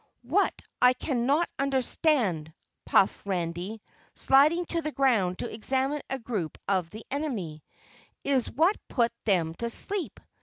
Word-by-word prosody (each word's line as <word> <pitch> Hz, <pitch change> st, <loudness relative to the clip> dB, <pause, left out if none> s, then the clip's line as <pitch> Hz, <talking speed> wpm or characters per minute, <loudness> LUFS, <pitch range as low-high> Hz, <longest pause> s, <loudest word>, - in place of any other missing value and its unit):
"What 330 Hz, +12 st, +1 dB, 0.2 s
I 250 Hz, 0 st, +7 dB
cannot 275 Hz, +5 st, +1 dB
understand," 260 Hz, -, +1 dB, 0.4 s
puffed 195 Hz, -, +3 dB
Randy, 185 Hz, +3 st, -3 dB, 0.3 s
sliding 305 Hz, +6 st, +4 dB
to 335 Hz, -, -1 dB
the 305 Hz, -1 st, -3 dB
ground 225 Hz, -11 st, +2 dB
to -, -, -4 dB
examine 265 Hz, +6 st, 0 dB
a 270 Hz, -, -1 dB
group 220 Hz, -, -4 dB
of 185 Hz, -4 st, +1 dB
the 215 Hz, +3 st, -10 dB
enemy, 215 Hz, -, -3 dB, 0.6 s
"is 270 Hz, -4 st, +1 dB
what 335 Hz, -, +2 dB
put 235 Hz, -2 st, +1 dB
them 175 Hz, -6 st, +2 dB
to 235 Hz, -, -1 dB
sleep? 390 Hz, -, -3 dB
245 Hz, 130 wpm, -28 LUFS, 195-280 Hz, 0.6 s, I